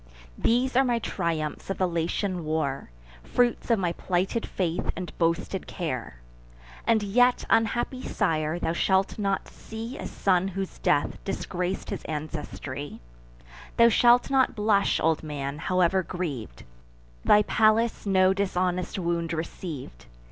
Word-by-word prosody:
These 250 +2 +2
are 265 - +6
my 245 -2 +1
triumphs 165 -9 -3
of 195 - -2
the 185 - +2
Latian 175 +2 -1
war, 155 - -2 0.3
Fruits 240 - 0
of 230 - +4
my 180 -3 0
plighted 185 +6 -1
faith 175 -3 -2
and 180 -2 -6
boasted 170 +3 0
care! 130 - -4 0.7
And 220 -2 +3
yet, 245 +5 +3
unhappy 240 +3 +1
sire, 160 -8 0
thou 165 -1 -1
shalt 190 +4 +1
not 195 -1 -1
see 225 +3 -8
A - - -4
son 185 -1 +1
whose 195 0 -5
death 145 - +1
disgrac'd 180 -1 -3
his - - -4
ancestry; 150 -2 -5 0.8
Thou 235 0 +7
shalt 240 +3 +4
not 265 -2 +3
blush, 210 -2 +2
old 160 -1 +2
man, 145 -2 -4
however 185 +2 +2
griev'd: 150 - -5 0.6
Thy 210 0 +6
Pallas 220 +1 +2
no 190 -1 +4
dishonest 185 -2 -1
wound 170 -2 -1
receiv'd. 155 - -6
185 Hz, 135 wpm, -26 LUFS, 160-210 Hz, 0.8 s, Thou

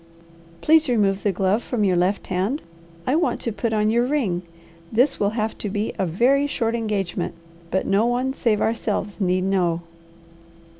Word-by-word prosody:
"Please 315 -2 +4
remove 200 -5 +2
the 205 - +1
glove 195 +4 +1
from 240 -4 -2
your 190 -3 +3
left 180 +3 +1
hand. 195 +10 -1 0.4
I 260 - +2
want 340 +2 +1
to 230 - -2
put 220 +2 -2
on 215 0 +2
your 235 +1 +3
ring. 245 -10 0 0.5
This 250 +6 +2
will 200 - +2
have 220 0 -1
to 210 - -3
be 205 +2 -2
a 190 - +1
very 255 - +3
short 230 -5 -1
engagement, 200 -7 -2 0.3
but 190 - 0
no 205 +4 +2
one 250 +2 0
save 225 -6 +1
ourselves 210 -2 -1
need 185 0 +2
know." 180 -3 +1
210 Hz, 170 wpm, -23 LUFS, 190-240 Hz, 0.5 s, Please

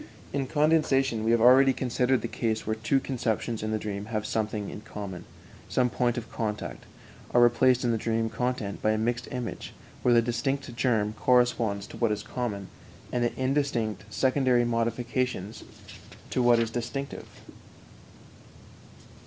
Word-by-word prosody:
In 135 -1 -1
condensation 135 -6 +2
we 110 - +1
have 115 -1 +3
already 130 +3 +7
considered 125 -1 0
the - - -1
case 110 -1 -2
where 110 - -1
two 110 +5 +1
conceptions 115 -3 -2
in 110 - -2
the 110 - 0
dream 105 -1 -4
having 110 -1 -3
something 110 -1 -2
in - - -8
common, 100 -4 -7 0.4
some 125 -1 +1
point 120 +3 0
of 115 - -6
contact, 105 -2 -4 0.5
are 120 - +7
replaced 125 +1 +4
in 120 - +2
the 115 - 0
dream 115 0 0
content 120 -4 -3
by 110 - +2
a - - 0
mixed 120 +2 -1
image, 125 -3 -5 0.3
where 125 - +3
the - - +7
distinct 120 +2 -2
germ 115 -4 +1
corresponds 120 -4 +2
to - - -11
what 115 -3 +1
is 105 0 -2
common, 105 -4 -4 0.4
and 120 - 0
the 120 - 0
indistinct 130 -5 0
secondary 130 -2 +2
modifications 115 -2 -2 0.7
to 125 - +1
what 120 -1 +5
is 115 -1 0
distinctive. 125 +4 -4
120 Hz, 155 wpm, -27 LUFS, 110-125 Hz, 0.7 s, already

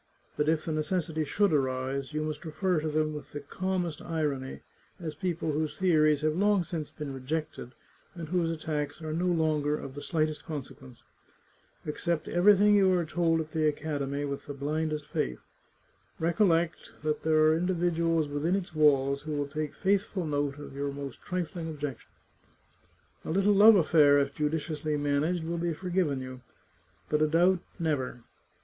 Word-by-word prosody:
But 150 +1 +1
if 160 -1 +1
the 165 - -2
necessity 155 0 -1
should 200 +4 +2
arise, 135 0 -1
you 155 0 -2
must 155 -1 -4
refer 170 +2 0
to 155 - -3
them 155 0 0
with 150 - -9
the 145 - -4
calmest 180 +2 -3
irony, 145 -5 -3 0.4
as 160 -3 -5
people 165 0 -2
whose 155 +1 -2
theories 155 -5 +3
have 155 0 +1
long 200 0 +3
since 160 -2 -5
been 150 -3 -6
rejected, 135 -1 -4 0.4
and 165 -2 -6
whose 175 -2 +1
attacks 155 -2 -3
are 155 0 -3
no 175 +3 0
longer 155 -3 +1
of 135 - -8
the 145 - -7
slightest 155 -2 -1
consequence. 130 -4 -8 0.8
Accept 160 +1 -2
everything 205 +3 +5
you 195 -2 +5
are 170 - 0
told 165 +1 +1
at 155 0 -8
the 155 -1 +1
academy 145 -2 -2
with 140 -1 -5
the 145 - -5
blindest 150 +1 -2
faith. 60 - -2 0.8
Recollect 170 -1 +1
that 155 0 -1
there 155 0 +2
are 155 0 +5
individuals 170 -2 +1
within 145 +5 0
its 190 -4 -4
walls 140 -3 +3
who 155 0 -5
will 145 -1 -1
take 155 +1 -4
faithful 195 -2 0
note 145 -2 -1
of 145 -2 -9
your 140 0 -2
most 140 -2 -7
trifling 170 -2 -4
objections. 145 -4 -6 1.1
A - - -7
little 195 +5 +3
love 210 +2 +8
afTair, 150 -5 +5
if 140 0 0
ju 150 0 0
diciously 155 -1 -2
managed, 145 +4 0
will 170 +1 -3
be 170 -1 -1
forgiven 175 -6 -1
you, 130 0 -8 0.7
but 150 0 +1
a 155 - +4
doubt, 175 +4 +3 0.2
never 140 -8 -2
155 Hz, 170 wpm, -29 LUFS, 145-170 Hz, 1.1 s, love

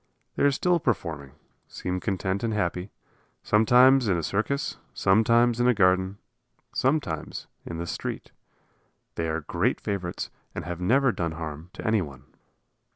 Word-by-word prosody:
They - - -3
are 145 - +6
still 175 +5 +2
performing, 80 - -2 0.3
seem 90 0 -4
content 95 0 -2
and 110 -2 0
happy, 90 -1 -1 0.5
sometimes 125 +4 +5
in 95 -4 +2
a 85 - -2
circus, 125 - -1 0.2
sometimes 115 +4 +4
in 120 - +3
a 125 - +4
garden, 95 0 +3 0.6
sometimes 130 - -1 0.2
in 85 - -5
the 85 - -3
street. - - -5 0.8
They 80 - -2
are 80 +1 -1
great - - 0
favorites 95 -4 -4 0.2
and - - -4
have 90 0 -5
never 125 +7 +3
done 85 -5 -2
harm 80 +1 -7
to - - -8
anyone. 80 - -1
95 Hz, 145 wpm, -26 LUFS, 85-120 Hz, 0.8 s, are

